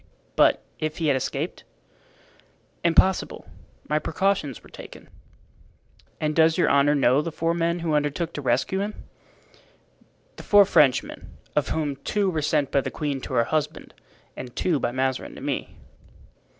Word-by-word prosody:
"But - - +4 0.2
if 155 0 -3
he 160 -3 0
had 140 - +3
escaped?" 130 - -3 1.2
"Impossible; 175 +3 +2 0.4
my 150 0 +1
precautions 160 - -1
were - - -16
taken." - - -12 1.1
"And 155 0 -1
does 160 0 +4
your - - +3
honor 140 +1 +4
know 135 0 +3
the 165 - -4
four 165 +2 -1
men 170 0 0
who 160 - 0
undertook 150 +3 -1
to 145 - -5
rescue 130 +9 0
him?" 205 +2 -3 1.4
"The - - -8
four 205 -1 +6
Frenchmen, 150 -8 +2 0.3
of - - +1
whom 145 -3 -2
two 200 +3 -1
were 160 -3 -1
sent 150 -2 0
by 140 - +3
the - - -4
queen 145 -4 -3
to - - -7
her 115 - +4
husband 150 +4 -3 0.4
and 125 -2 -8
two 165 -6 +1
by 120 - -1
Mazarin 130 +1 -2
to - - -10
me." - - -4
150 Hz, 155 wpm, -24 LUFS, 140-170 Hz, 1.4 s, four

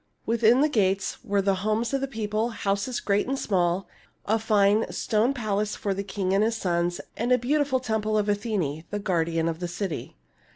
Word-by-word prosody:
Within 235 +2 +4
the 300 - +5
gates 195 -8 0
were 200 -4 0
the 195 0 +3
homes 215 +4 0
of 275 - +1
the 275 - -1
people, 220 -1 -2
houses 205 +2 -1
great 200 +2 +1
and 270 +1 -1
small, 180 -4 0 0.4
a 220 +2 +2
fine 210 0 +3
stone 225 +3 +1
palace 215 -5 -1
for 200 - -2
the 195 - -3
king 190 -1 -2
and 200 +2 +3
his 225 +1 0
sons, 175 -3 0 0.2
and 240 +3 -1
a 250 - +6
beautiful 270 +2 +1
temple 215 -3 -1
of 210 -1 +1
Athene, 200 -8 -1
the 205 - -2
guardian 165 -4 0
of 165 -1 -2
the 175 - -3
city. 175 0 -4
210 Hz, 195 wpm, -26 LUFS, 195-230 Hz, 0.4 s, a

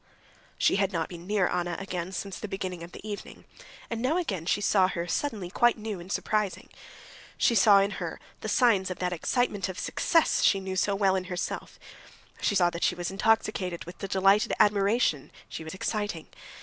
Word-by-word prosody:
She - - +3
had 195 -1 +1
not 165 -3 -2
been 175 0 -10
near 205 -3 +2
Anna 175 -1 -1
again 185 -2 -4
since 195 0 -5
the 215 - -5
beginning 185 -3 -4
of 170 +1 -9
the 215 - -10
evening, 205 -1 -7 0.4
and 230 -1 -4
now 275 +7 +1
again 195 - -3
she 205 - +2
saw 195 -2 +3
her 170 -2 -3
suddenly 200 -3 -2
quite 240 +3 +3
new 215 -3 -5
and 175 +3 -9
surprising. 210 -3 -1 0.7
She - - +3
saw 205 -1 +6
in 200 +1 0
her - - -4 0.2
the - - -5
signs 205 -7 +3
of 185 - -4
that 180 -1 -1
excitement 205 +1 0
of 185 - -6
success 330 -2 +2
she 195 - +4
knew 190 -1 -5
so 200 +2 +1
well 195 -1 +2
in 185 -1 -2
herself; 180 -1 -4 0.6
she 205 - +1
saw 175 -2 +4
that 170 - -5
she - - +2
was 175 +1 -4
intoxicated 195 -3 0
with 175 - -11
the 195 - -4
delighted 195 +2 +3
admiration 200 - +2 0.2
she 160 - -7
was 160 +3 -7
exciting. 205 -4 -3
195 Hz, 195 wpm, -28 LUFS, 180-210 Hz, 0.7 s, saw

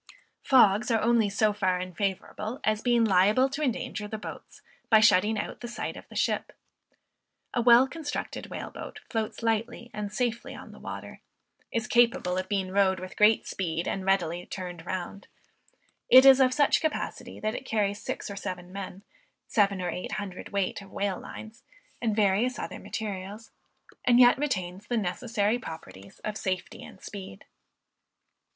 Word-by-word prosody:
Fogs 240 -3 +5
are 225 -2 +3
only 230 -1 +3
so 210 +1 +2
far 185 -3 0
unfavorable 195 - -3
as 215 0 +1
being 240 -1 +3
liable 210 +6 +4
to 275 +3 -5
endanger 250 -5 -2
the 220 - -5
boats 210 - -10 0.3
by 220 - +7
shutting 210 +1 +4
out - - -4
the 240 - -5
sight 235 - -5
of - - -12
the - - -13
ship. - - 0 1.0
A 240 - +1
well 240 +2 +7
constructed 300 +1 -5
whale - - -6
boat - - -8
floats 225 0 -3
lightly 230 +1 -1
and 210 -1 -4
safely 235 0 -2
on - - -11
the - - -13
water, - - -8 0.5
is 230 0 -1
capable 240 -6 +3
of 185 - -5
being 195 -2 -1
rowed 190 -1 +3
with 185 0 -8
great 210 +1 +4
speed, 170 -3 -3
and 195 - -2
readily 175 -3 +1
turned 175 -3 -7
round, 185 +2 -5 0.8
it 260 +1 +9
is 270 -1 +9
of 260 -1 +5
such 290 +2 +3
capacity 315 - -3
that 215 0 -1
it - - -5
carries 210 -3 -1
six - - -4
or 200 - -6
seven 185 -2 -6
men, 195 0 -7 0.4
seven 200 -3 +2
or 180 -1 -2
eight 180 - -5
hundred 190 -3 -5
weight 200 -1 -1
of 195 - -13
whale 200 -2 -2
lines, 220 +1 -10 0.4
and 225 -3 0
various 215 +4 +2
other - - -5
materials, 205 +1 -6 0.5
and 245 -1 +5
yet 245 +1 +7
retains 195 -8 -2
the 240 - 0
necessary 215 +3 0
properties 100 - -10
of 215 0 -3
safety 185 -3 -3
and 190 - -13
speed. 190 - -9
210 Hz, 165 wpm, -28 LUFS, 190-235 Hz, 1.0 s, it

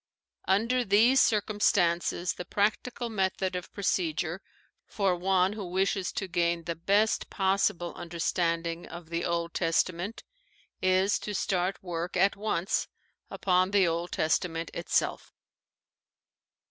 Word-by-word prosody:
Under 230 +6 +2
these 230 +6 +5
circumstances 185 -5 +1
the - - -6
practical 215 +6 -1
method 190 -3 -1
of 180 - -5
procedure 175 -2 -1 0.5
for 195 -3 +1
one 185 +1 +2
who 210 -1 -6
wishes 190 +1 0
to 195 - -3
gain 170 -1 0
the 170 - -3
best 200 +6 +1
possible 190 -2 0
understanding 170 0 -2
of 170 -1 -10
the 170 0 -1
Old 170 -1 -1
Testament 175 +4 -1 0.6
is 185 +2 +3
to 210 - -5
start 190 -1 -1
work 175 0 -3
at 195 +2 +3
once 200 -3 -1 0.4
upon 185 0 +1
the 195 -2 +3
Old 170 +1 -2
Testament 165 +1 -1
itself. - - -1
185 Hz, 120 wpm, -28 LUFS, 170-200 Hz, 0.6 s, these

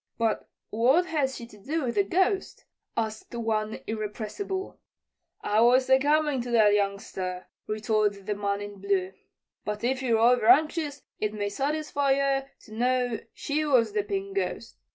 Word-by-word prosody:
"But 225 -2 -1 0.2
what 260 +11 +3
has 290 -6 -1
she 235 - -7
to 210 -3 -16
do 305 +9 -2
with 240 -2 -1
the 205 -2 +3
Ghost?" 375 - 0 0.3
asked 220 +1 -3
one 220 -2 -2
irrepressible. 220 - -4 0.6
"I 210 +2 +2
was 250 +2 +5
a 265 - +7
comin' 295 -1 +2
to 245 - -6
that, 220 -3 +5
youngster," 195 -2 -2 0.2
retorted 215 -2 0
the 210 - -1
man 200 0 -2
in 205 -1 -8
blue; 190 -2 0 0.5
"but 210 +1 -4
if 260 +2 0
ye're 235 -4 +2
overanxious, 275 +6 +3 0.2
it 210 0 -1
may 205 -1 -2
satisfy 285 +3 0
yer 275 0 0
to 215 - -14
know 245 0 +1
she 300 +1 -2
was 260 - +3
the 425 - +2
Pink 395 0 -4
Ghost. - - -3
235 Hz, 155 wpm, -27 LUFS, 210-285 Hz, 0.6 s, a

